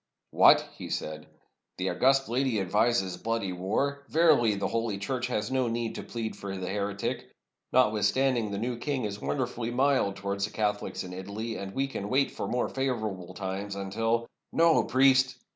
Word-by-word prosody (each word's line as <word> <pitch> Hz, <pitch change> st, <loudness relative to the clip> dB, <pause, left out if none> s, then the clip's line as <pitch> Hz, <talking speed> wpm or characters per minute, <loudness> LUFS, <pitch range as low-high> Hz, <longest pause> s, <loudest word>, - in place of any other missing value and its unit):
"What!" -, -, +6 dB
he -, -, -8 dB
said, 75 Hz, 0 st, -4 dB, 0.5 s
"the -, -, -1 dB
august 135 Hz, +1 st, +3 dB
lady 125 Hz, -2 st, +1 dB
advises 95 Hz, -1 st, +1 dB
bloody 115 Hz, -3 st, -2 dB
war? 125 Hz, +11 st, -1 dB
Verily, 150 Hz, -10 st, +4 dB
the 100 Hz, -, -1 dB
Holy 115 Hz, -3 st, -1 dB
Church 125 Hz, +5 st, -2 dB
has 110 Hz, -1 st, -2 dB
no 130 Hz, -2 st, +1 dB
need 115 Hz, 0 st, -2 dB
to -, -, -5 dB
plead 115 Hz, -2 st, -5 dB
for 95 Hz, -1 st, -6 dB
the 90 Hz, -1 st, -4 dB
heretic. 100 Hz, 0 st, -3 dB, 0.4 s
Notwithstanding, 115 Hz, +1 st, +2 dB
the 100 Hz, -, -3 dB
new 120 Hz, +3 st, -2 dB
king 135 Hz, -2 st, -2 dB
is 105 Hz, -1 st, -5 dB
wonder 130 Hz, -3 st, 0 dB
fully 120 Hz, -1 st, -5 dB
mild 130 Hz, -5 st, +2 dB
towards 100 Hz, 0 st, -2 dB
the 110 Hz, -, -8 dB
Catholics 105 Hz, -1 st, -2 dB
in 90 Hz, 0 st, -8 dB
Italy; 100 Hz, +5 st, -5 dB
and 100 Hz, -2 st, -6 dB
we 135 Hz, -, +1 dB
can 105 Hz, -7 st, -5 dB
wait 135 Hz, +2 st, +2 dB
for -, -, -4 dB
more 125 Hz, -, 0 dB
favorable 110 Hz, -9 st, -3 dB
times, 100 Hz, +1 st, -4 dB
until 115 Hz, +4 st, -1 dB
— -, -, -58 dB
" -, -, -56 dB
"No, 165 Hz, -1 st, +4 dB
priest!" 130 Hz, -1 st, +4 dB
115 Hz, 180 wpm, -28 LUFS, 100-130 Hz, 0.5 s, What